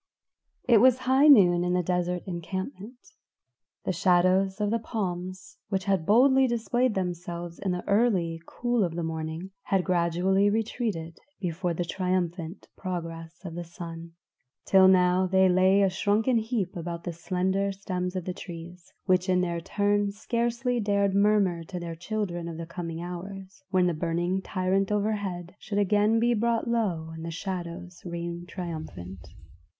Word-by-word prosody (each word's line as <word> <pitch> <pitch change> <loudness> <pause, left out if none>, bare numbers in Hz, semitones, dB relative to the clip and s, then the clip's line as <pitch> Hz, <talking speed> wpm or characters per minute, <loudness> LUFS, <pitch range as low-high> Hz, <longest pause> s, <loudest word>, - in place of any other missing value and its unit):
It 235 -3 +7
was 255 +1 +6
high 260 +3 +4
noon 180 -11 +7
in 180 0 0
the 180 0 +1
desert 180 0 -1
encampment. 190 - -5 0.9
The - - 0
shadows 185 +2 +3
of 210 0 0
the 230 - +1
palms, 185 -4 -5
which 190 -2 -1
had 190 -5 0
boldly 265 +4 +5
displayed 240 0 0
themselves 175 -2 -4
in 195 - -1
the 180 0 -4
early 190 -7 +2
cool 240 -2 0
of 170 -3 -2
the 170 - -2
morning, 160 +3 -4
had 195 -2 +1
gradually 180 +3 +2
retreated 205 -6 -2 0.2
before 175 -1 -2
the 175 - -2
triumphant 180 -1 -2
progress 165 -1 -6
of 170 - -5
the 175 +1 -5
sun, 170 -1 -9 0.5
till 190 -1 +6
now 185 0 +4
they 190 0 +4
lay 185 +2 +4
a 195 - +4
shrunken 215 +5 +2
heap 220 -5 -2
about 170 0 -5
the 175 - -4
slender 190 +3 -1
stems 185 -2 -4
of 185 -2 -3
the 180 - -3
trees, 175 0 -10
which 185 -1 +2
in 180 0 +3
their 170 -2 -1
turn 205 +3 +1
scarcely 235 +3 -1
dared 200 -2 +1
murmur 200 -4 +3
to 180 +2 -6
their 170 -1 -5
children 175 -1 -3
of 165 -1 -6
the 165 - -5
coming 165 -1 -5
hours, 190 +2 -8
when 185 -2 +3
the 175 - +2
burning 175 +3 -1
tyrant 190 +1 0
overhead 200 -4 -2
should 205 - -4
again 210 +2 +3
be 240 +1 +3
brought 230 +1 0
low 190 -9 -1
and 160 0 -8
the 165 - -4
shadows 180 0 -6
reign 170 0 -5
triumphant. 155 - -7
185 Hz, 155 wpm, -27 LUFS, 170-205 Hz, 0.9 s, It